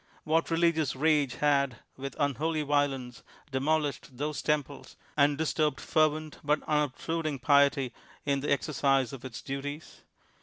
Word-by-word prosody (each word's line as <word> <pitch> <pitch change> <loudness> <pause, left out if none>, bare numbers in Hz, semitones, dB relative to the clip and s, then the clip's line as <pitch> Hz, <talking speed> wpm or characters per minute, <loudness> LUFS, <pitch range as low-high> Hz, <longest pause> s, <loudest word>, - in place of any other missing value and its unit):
What 160 +2 +1
religious 165 -4 +2
rage 145 -3 +2
had, 140 -4 +2 0.2
with 135 0 -6
unholy 150 +3 0
violence, 140 -4 0 0.3
demolished 140 -1 -1
those 150 +2 -2
temples, 145 -2 -2 0.2
and 145 -1 +3
disturbed 155 -2 0
fervent, 155 0 +1
but 150 +1 +2
unobtrudiug 150 0 -1
piety 140 -3 +4 0.3
in 140 -1 +1
the 145 - -2
exercise 135 -3 +1
of 130 - -8
its 130 -3 -7
duties 145 +3 -6
145 Hz, 125 wpm, -29 LUFS, 135-155 Hz, 0.3 s, piety